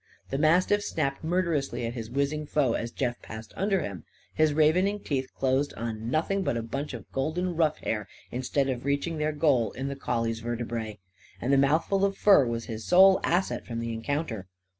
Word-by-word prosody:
The 135 - -1
mastiff 180 +6 +3
snapped 140 -6 -2
murderously 160 -8 0
at 115 - -3
his 115 -3 -6
whizzing 140 +4 -1
foe, 140 -6 +2
as 115 - -2
Jeff 120 -1 -3
passed 110 +1 -9
under 195 -1 +1
him. 95 - -6 0.3
His 155 -1 +3
ravening 175 +7 +3
teeth 135 -3 -2
closed 135 +2 0
on 115 -1 -4
nothing 165 +8 0
but 120 - 0
a 115 - -2
bunch 135 +4 -4
of 115 - -11
golden 170 +6 -1
ruff 160 -2 +2
hair 105 -2 -3 0.2
instead 130 +2 0
of 125 -2 -2
reaching 140 +4 -1
their 150 0 +1
goal 140 -8 +2
in 135 +1 -4
the 140 - -4
collie's 115 -4 -2
vertebræ. 115 -2 -4 0.4
And 130 +3 0
the - - +5
mouthful 160 +8 +2
of 195 0 +1
fur 195 -11 +6
was 115 0 -3
his 110 -1 -6
sole 190 - +6
asset 180 +3 0
from 115 -1 -4
the 115 0 -3
encounter. 115 - -3
140 Hz, 190 wpm, -28 LUFS, 115-160 Hz, 0.4 s, fur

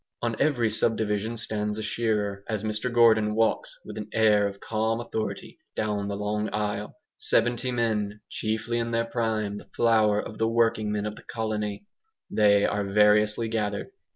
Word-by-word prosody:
On 115 -1 0
every 125 -7 +2
subdivision 110 0 0
stands 105 -1 -1
a 110 - -4
shearer, 105 -3 -1
as 110 -2 -2
Mr 110 +3 -2
Gordon 110 -3 +4
walks, 115 0 0
with - - -7
an 105 0 -6
air 105 -2 +4
of 100 0 -7
calm 110 +2 -1
authority, 110 -2 -4 0.2
down 105 -2 -1
the 100 - -3
long 105 +1 -2
aisle. 105 0 -3 0.2
Seventy 120 +2 +1
men, 105 -3 -1
chiefly 110 +2 -2
in 115 0 -1
their 115 0 0
prime, 110 -3 -1
the - - -16
flower 110 -3 +4
of 105 - -6
the 110 - +2
working 115 -2 +2
men 105 0 -1
of 105 0 -4
the - - -11
colony, 110 - -3 0.5
they 100 -1 +4
are 105 0 0
variously 105 +2 +3
gathered. 110 - -2
110 Hz, 165 wpm, -26 LUFS, 105-115 Hz, 0.5 s, Gordon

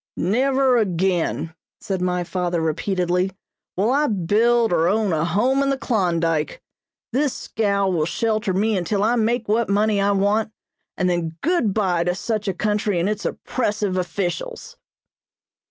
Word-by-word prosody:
"Never 260 - +2
again," 180 -5 0 0.3
said 190 -2 -3
my 180 0 0
father 175 -1 -2
repeatedly, 180 +3 0 0.5
"will 210 +6 +2
I 295 +3 +2
build 225 +3 +2
or 165 0 +3
own 205 -1 +1
a 155 -1 +1
home 225 +11 +1
in 275 - +1
the 275 - 0
Klondyke. 170 - 0 0.5
This 275 +1 +1
scow 200 -2 0
will 165 -5 0
shelter 215 +1 0
me 210 +4 +1
until 195 +2 0
I 230 +3 +2
make 230 0 0
what 220 +1 +1
money 205 0 +2
I 200 - +2
want, 205 +2 +1 0.4
and 185 - +1
then 170 -2 -1
good 335 - +1
bye 185 -4 +1
to 180 0 0
such 215 +1 -3
a 195 - 0
country 210 -2 0
and 170 - +1
its 210 0 -2
oppressive 210 -5 -2
officials." 175 0 -3
200 Hz, 155 wpm, -22 LUFS, 180-225 Hz, 0.5 s, or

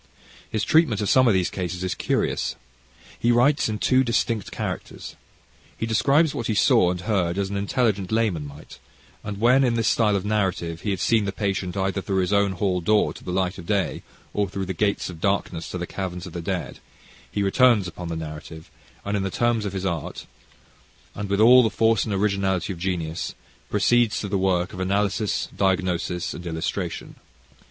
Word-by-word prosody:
His 110 -1 -1
treatment 150 -4 +3
of 105 - -1
some 130 -1 +5
of 110 - +4
these 90 -2 +1
cases 90 -1 -4
is 95 - -1
curious. - - -1 0.6
He 120 - +3
writes 125 +3 +3
in 110 - -2
two 130 +4 +3
distinct 115 -3 0
characters. - - -6 0.6
He - - -2
describes 140 +7 +3
what 120 - -3
he 110 - 0
saw 90 -2 +4
and 90 0 -3
heard 90 -3 0
as 100 -1 -1
an - - -3
intelligent 100 -1 0
layman 105 -10 0
might, 70 +1 -13 0.4
and 105 -1 -5
when 125 +4 +5
in 120 -2 +2
this 115 -2 +1
style 105 -3 +3
of 100 0 -2
narrative 95 -5 -1
he - - -3
had 95 -3 -1
seen 110 +1 +2
the 100 - -1
patient 100 -2 -2
either 95 0 -1
through 95 0 0
his 90 +2 0
own 100 -1 +3
hall 90 -1 0
door, 105 +5 +2
to - - -13
the - - -5
light 95 +1 -1
of 85 - -10
day, 100 -5 0 0.3
or 100 -2 0
through 95 0 -4
the 95 - -3
gates 100 +3 0
of 85 -3 -9
darkness 95 -4 -1
to - - -4
the 90 - -3
caverns 90 -2 -5
of 90 - -9
the 85 - -4
dead, 90 +1 -4 0.5
he 100 - -1
returns 110 -1 +4
upon 90 0 -7
the 85 - -3
narrative, 80 0 -8 0.3
and 100 +1 -1
in 100 - 0
the 95 - -1
terms 120 +1 0
of 100 - -3
his 95 -1 -3
art 85 -5 -3 0.9
and 100 -1 -5
with 100 0 +1
all 125 +4 +8
the 115 - +2
force 115 +1 +2
and 110 - -3
originality 95 -1 0
of 85 - -11
genius, 85 -3 -3 0.3
proceeds 115 +2 +2
to 105 - -4
the 100 -1 -1
work 90 -1 +1
of 90 - -7
analysis, 100 +2 0
diagnosis 90 -2 0
and 85 - -8
illustration. 80 -1 -4
100 Hz, 200 wpm, -24 LUFS, 90-110 Hz, 0.9 s, all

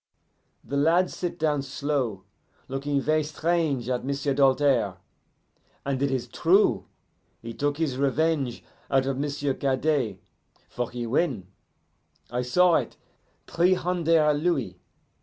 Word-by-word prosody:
The 140 - -3
lad 170 +5 +3
sit 175 -1 -4
down 150 -2 +1
slow, 135 -7 -2 0.4
looking 140 +1 -1
ver' 155 +2 +2
strange 155 -4 -1
at 125 -1 -1
M'sieu' 140 +1 -1
Doltaire. 135 -6 +2 0.9
And 135 -1 -1
it 140 - +2
is 130 -2 -2
true: 165 - +2 0.5
he 115 0 -8
took 145 +3 -1
his 145 -5 -1
revenge 140 -2 0 0.3
out 135 -1 +2
of 135 0 -2
M'sieu' 145 -1 -1
Cadet, 135 -5 0 0.5
for 125 -1 -4
he 120 -1 -5
win 115 - -1 0.8
I 125 +1 -1
saw 170 +7 +4
it - - -4 0.5
three 180 +2 +2
hunder' 165 -4 +2
louis. 145 - -1
140 Hz, 125 wpm, -26 LUFS, 130-155 Hz, 0.9 s, saw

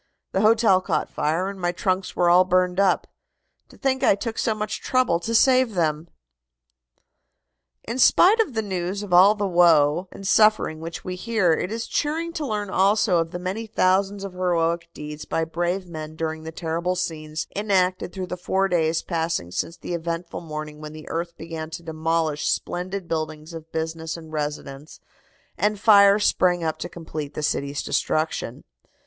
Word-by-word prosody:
The 190 - 0
hotel 215 -3 +4
caught - - -2
fire, 160 +5 0
and 195 -1 -7
my 175 0 +1
trunks 185 +1 -2
were 175 - +2
all 175 +1 +6
burned 185 0 +1
up. 195 -2 +3 0.6
To - - -17
think 265 -1 0
I - - +5
took 225 +2 -5
so 220 - +1
much 215 0 -4
trouble 255 -10 +1
to 230 +6 -3
save 255 -2 +4
them!" 160 -1 0 1.8
In 235 +3 -4
spite 390 - +6
of 375 - +1
the 220 - 0
news 190 0 -3
of 195 -3 -5
all 190 +4 +7
the 205 -1 -2
woe 170 -1 +4
and 195 - -7
suffering 215 -7 +3
which 165 +1 -7
we 185 - -4
hear, 195 -3 +1
it 180 - -2
is 225 0 -3
cheering 325 +3 -2
to 305 -3 -3
learn 210 -3 -3
also 200 -1 +3
of 165 0 -1
the 175 - -5
many 190 +5 -4
thousands 195 0 +1
of 195 -2 -6
heroic 170 -2 0
deeds 150 0 -7
by 165 - -1
brave 175 +3 -2
men 155 -2 -7
during 160 0 -3
the 160 - -5
terrible 170 +2 -2
scenes 155 -4 -4
enacted 190 -3 +1
through 190 -1 -5
the 180 0 -6
four 190 +2 0
days 165 -3 +1
passing 165 - -2
since 165 - -3
the - - -6
eventful 170 +1 -4
morning 155 -2 -7
when 150 0 -8
the 155 0 -11
earth 170 +1 -4
began 160 -1 -6
to 170 - -8
demolish 160 -1 -1
splendid 185 +1 -3
buildings 155 0 -4
of 160 0 -10
business 160 0 -4
and 160 -1 -12
residence 145 -1 -5 0.6
and 210 0 +1
fire 200 -1 +7
sprang 180 -4 +2
up 160 -1 -2
to 175 - -5
complete 155 -4 -7
the 155 - -4
city's 140 -1 -1
destruction. 155 -6 -1
175 Hz, 180 wpm, -23 LUFS, 160-200 Hz, 1.8 s, all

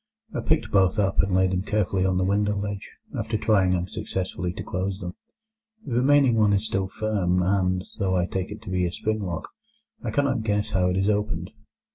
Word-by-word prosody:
I - - -1
picked - - 0
both 95 0 +3
up, 100 -2 +1
and 95 - -2
laid 95 0 +3
them 90 0 0
carefully 95 -2 0
on 95 -1 +1
the 95 - +2
window 105 +2 +1
ledge, 100 0 -4 0.3
after 110 0 -1
trying 95 -4 +3
unsuccessfully 90 0 -3
to - - -6
close 95 +2 -3
them. 90 -2 -5 0.7
The 125 - -4
remaining 130 -1 +4
one 105 -2 +4
is 100 +2 +1
still 95 -3 -1
firm, 95 -3 0
and, 95 -1 +1 0.2
though 95 -1 +1
I 90 -1 +2
take 95 +1 -3
it 105 - -9
to - - -7
be 90 -1 +1
a - - -4
spring 110 +4 -2
lock, 85 -5 -4 0.5
I - - -2
cannot 140 -4 +1
guess 105 -1 0
how 90 -2 +2
it 90 - 0
is 95 +1 +1
opened. 100 -5 -1
95 Hz, 205 wpm, -25 LUFS, 90-105 Hz, 0.7 s, remaining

